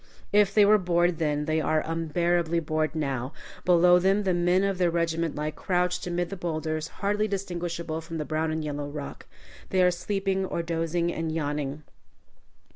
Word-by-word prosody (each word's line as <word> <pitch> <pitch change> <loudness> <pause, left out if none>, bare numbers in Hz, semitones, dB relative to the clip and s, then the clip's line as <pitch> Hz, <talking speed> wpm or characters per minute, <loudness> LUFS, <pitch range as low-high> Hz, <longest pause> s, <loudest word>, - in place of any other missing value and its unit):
If 205 -1 +5
they 205 0 +5
were 210 +1 +6
bored 175 -2 +1
then, 150 -2 0
they 155 0 +1
are 155 0 +1
unbearably 170 +1 0
bored 155 0 -1
now. 135 -3 -2 0.3
Below 180 0 +6
them 195 +3 +2
the 190 -2 +1
men 175 +2 +2
of 195 -2 0
their 180 -1 +3
regiment 165 -1 -1
lie 150 +1 -2
crouched 180 +3 -1
amid 175 0 -2
the - - -3
bowlders, 155 -3 -3 0.2
hardly 210 +1 +1
distinguishable 170 -4 -3
from 165 0 -6
the 150 - -3
brown 155 +1 -1
and 155 -1 -2
yellow 145 -1 -4
rock. 145 -1 -7 0.4
They 185 -1 +3
are 180 - +5
sleeping, 195 +1 -1
or 170 -2 -2
dozing, 165 +1 -1
or 165 0 -3
yawning. 150 -2 -3
170 Hz, 175 wpm, -27 LUFS, 155-180 Hz, 0.4 s, were